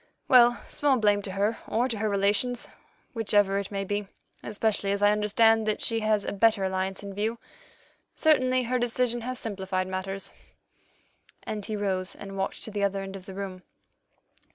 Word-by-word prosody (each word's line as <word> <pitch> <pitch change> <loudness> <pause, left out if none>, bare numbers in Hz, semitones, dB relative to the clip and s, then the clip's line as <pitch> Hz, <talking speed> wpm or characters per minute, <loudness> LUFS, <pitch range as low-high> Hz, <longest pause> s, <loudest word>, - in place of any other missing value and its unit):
Well, 240 -1 +6
small 285 -3 +1
blame 205 -2 +3
to 195 -2 -5
her 205 +3 0
or 235 +3 +1
to 230 -5 -4
her 215 0 0
relations, 205 +5 +1 0.5
whichever 205 -3 +2
it 200 - -5
may 195 -1 -3
be, 205 +1 -2 0.3
especially 210 -1 -1
as 200 0 0
I 205 - +6
understand 220 +1 +3
that 215 - -1
she 230 -1 +1
has 215 -2 +1
a - - -2
better 210 -1 +3
alliance 190 +1 -2
in 200 -1 -7
view. 220 +4 -1 0.8
Certainly 255 -5 +3
her 250 +1 0
decision 240 0 0
has 255 +2 -4
simplified 190 -4 -2
matters," 190 +1 -5 1.1
and 210 -1 -4
he 215 - -3
rose 190 -2 -1
and 195 -1 -9
walked 195 0 -3
to 220 - -6
the 205 -1 -2
other 195 0 0
end 195 0 -7
of 185 -1 -10
the 190 - -8
room. 190 -2 -6
205 Hz, 175 wpm, -27 LUFS, 195-225 Hz, 1.1 s, Well